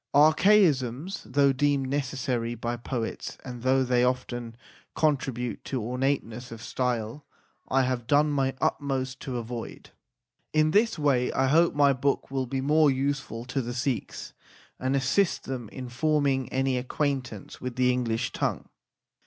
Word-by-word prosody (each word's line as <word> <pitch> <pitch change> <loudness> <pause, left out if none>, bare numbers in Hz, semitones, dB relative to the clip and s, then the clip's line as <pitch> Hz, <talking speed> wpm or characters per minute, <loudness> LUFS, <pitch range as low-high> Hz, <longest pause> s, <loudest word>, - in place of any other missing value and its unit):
Archaisms, 155 - +4
though 140 +3 +3
deemed 140 0 +1
necessary 130 -4 -2
by 120 +1 -3
poets, 120 -1 -4
and 125 -2 -7
though 130 +1 +3
they 125 -1 +2
often 120 -2 -2 0.4
contribute 135 -6 -1
to 130 - -3
ornateness 125 0 -2
of 115 - -8
style, 120 +2 -2 0.4
I 135 0 +2
have 125 -2 -2
done 150 +1 +4
my 135 -2 0
utmost 130 -2 -1
to 130 -2 -4
avoid. 120 0 -7 0.6
In 155 0 +3
this 215 +2 +3
way 135 -5 +2
I 135 - +2
hope 165 +3 +4
my 140 -1 +5
book 135 +1 -1
will 135 -2 -1
be 135 +2 -2
more 150 +2 +4
useful 135 -3 -2
to 135 +2 -2
the 120 0 -5
Sikhs, 125 -1 -3 0.5
and 130 +2 0
assist 140 +8 +1
them 125 -5 -5
in 130 -1 -7
forming 135 0 +1
an 135 0 0
acquaintance 130 -3 -2
with 125 -1 -4
the 125 0 +3
English 120 -3 -1
tongue. - - -2
130 Hz, 145 wpm, -27 LUFS, 125-140 Hz, 0.6 s, my